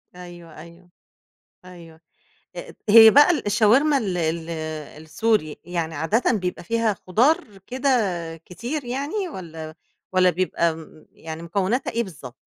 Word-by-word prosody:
أيوه، 175 Hz, -2 st, -12 dB
أيوه، 170 Hz, +2 st, -15 dB, 0.8 s
أيوه 165 Hz, -3 st, -14 dB, 0.6 s
آآ، -, -, -8 dB
هي 225 Hz, +1 st, +9 dB
بقى 290 Hz, +7 st, +6 dB
ال 330 Hz, -, 0 dB
الشاورما 240 Hz, +8 st, +3 dB
ال 190 Hz, -7 st, -3 dB
ال 165 Hz, 0 st, -2 dB, 0.5 s
السوري، 160 Hz, -1 st, -1 dB
يعني 170 Hz, -2 st, -4 dB
عادةً 200 Hz, +12 st, +1 dB
بيبقى 180 Hz, -5 st, -3 dB
فيها 230 Hz, +1 st, 0 dB
خُضار 235 Hz, -, +1 dB
كده 260 Hz, +2 st, -2 dB, 0.6 s
كتير، 245 Hz, -, -5 dB
يعني 285 Hz, -, -3 dB
والَّا 160 Hz, -, -9 dB, 0.4 s
والَّا 185 Hz, -1 st, +4 dB
بيبقى 170 Hz, -2 st, -1 dB
م 160 Hz, -1 st, -14 dB
يعني 160 Hz, 0 st, -9 dB
مكوناتها 195 Hz, +8 st, -1 dB
إيه 235 Hz, -, -1 dB
بالضبط؟ 140 Hz, -, -11 dB
185 Hz, 130 wpm, -23 LUFS, 165-230 Hz, 0.8 s, هي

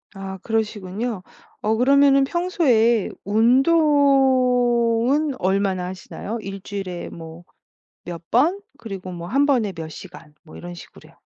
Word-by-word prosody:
아 195 Hz, -1 st, -7 dB
그러시군요. 215 Hz, -1 st, -3 dB, 0.4 s
어 220 Hz, +1 st, +1 dB
그러면은 275 Hz, +2 st, +4 dB
평소에 265 Hz, -, +1 dB
운동은 260 Hz, -, +3 dB
얼마나 190 Hz, -1 st, 0 dB
하시나요? 190 Hz, +4 st, -7 dB
1 195 Hz, -1 st, -7 dB
주일에 185 Hz, -3 st, -6 dB
뭐 165 Hz, +1 st, -11 dB, 0.6 s
몇 170 Hz, -2 st, -7 dB
번? 320 Hz, -, +3 dB, 0.2 s
그리고 195 Hz, -6 st, -8 dB
뭐 170 Hz, -1 st, -7 dB
1 275 Hz, +7 st, +2 dB
번에 245 Hz, -8 st, +1 dB
몇 165 Hz, -2 st, -7 dB
시간 165 Hz, -2 st, -12 dB
뭐 165 Hz, -, -14 dB
이런 175 Hz, 0 st, -8 dB
식으로요. 175 Hz, -, -14 dB
225 Hz, 245 characters per minute, -22 LUFS, 185-270 Hz, 0.6 s, 그러면은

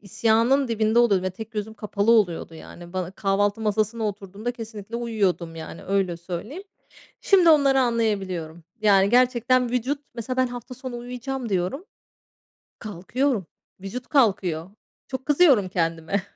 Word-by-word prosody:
isyanın 230 Hz, +6 st, +2 dB
dibinde 220 Hz, 0 st, +2 dB
oluyordum 205 Hz, -6 st, +4 dB
ve -, -, -1 dB
tek 220 Hz, +4 st, -9 dB
gözüm 215 Hz, 0 st, -5 dB
kapalı 210 Hz, 0 st, 0 dB
oluyordu. 180 Hz, -7 st, +1 dB
Yani, 175 Hz, +2 st, -12 dB
bana 185 Hz, -2 st, -3 dB
kahvaltı 200 Hz, +2 st, 0 dB
masasına 215 Hz, +1 st, 0 dB
oturduğumda 205 Hz, +3 st, -5 dB
kesinlikle 225 Hz, -2 st, -7 dB
uyuyordum, 195 Hz, -8 st, -1 dB
yani, 160 Hz, 0 st, -8 dB
öyle 190 Hz, -3 st, 0 dB
söyleyeyim. 185 Hz, -, -6 dB, 0.6 s
Şimdi 370 Hz, -4 st, +5 dB
onları 275 Hz, -3 st, +5 dB
anlayabiliyorum. 195 Hz, -9 st, -1 dB, 0.2 s
Yani, 200 Hz, -2 st, +4 dB
gerçekten 250 Hz, 0 st, +3 dB
vücut 250 Hz, +4 st, -1 dB, 0.2 s
Mesela 240 Hz, +2 st, -4 dB
ben 255 Hz, 0 st, +3 dB
hafta 245 Hz, 0 st, -8 dB
sonu 255 Hz, -1 st, -7 dB
uyuyacağım 250 Hz, +1 st, -5 dB
diyorum, 190 Hz, -, -1 dB, 1.0 s
kalkıyorum. 215 Hz, -, -2 dB, 0.4 s
Vücut 235 Hz, +6 st, -6 dB
kalkıyor. 190 Hz, -, +1 dB, 0.4 s
Çok 260 Hz, 0 st, -5 dB
kızıyorum 280 Hz, -, +4 dB
kendime. 165 Hz, +2 st, -1 dB
220 Hz, 130 wpm, -24 LUFS, 190-250 Hz, 1.0 s, Şimdi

